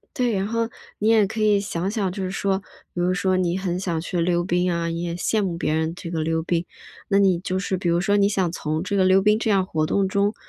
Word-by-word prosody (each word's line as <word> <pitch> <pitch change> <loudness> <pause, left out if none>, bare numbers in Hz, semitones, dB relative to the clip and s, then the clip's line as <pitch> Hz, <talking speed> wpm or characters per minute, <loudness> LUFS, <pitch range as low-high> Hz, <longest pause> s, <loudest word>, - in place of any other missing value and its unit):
对， 245 -3 +1
然 195 0 0
后 230 0 -1 0.3
你 215 - 0
也 225 -2 +5
可 220 +3 -5
以 210 -1 +4
想 185 -2 -2
想， 200 -4 -1
就 195 +1 -5
是 185 - -2
说， 195 0 0 0.3
比 175 - -5
如 180 +1 +2
说 185 0 +1
你 180 0 0
很 180 -2 -2
想 170 -4 -2
去 175 +1 -3
溜 175 0 +1
冰 180 0 +1
啊， 170 0 -1
你 165 0 -3
也 170 -1 -3
羡 210 +5 0
慕 180 -4 -2
别 155 - -1
人 160 +1 0
这 170 -1 -7
个 165 -2 -2
溜 160 0 -1
冰。 170 0 -1 0.4
那 195 - +2
你 190 -3 +4
就 185 +1 -2
是 190 -1 -2
比 175 - -3
如 170 +1 +2
说 205 +2 +2
你 200 -1 +4
想 190 -4 0
从 155 -1 -3
这 200 +1 -1
个 190 - +4
溜 190 +1 +5
冰 210 +2 +3
这 225 - -1
样 195 -2 +3
活 155 -4 -1
动 195 +3 +1
中， 200 +2 +1
185 Hz, 290 characters per minute, -23 LUFS, 170-200 Hz, 0.4 s, 也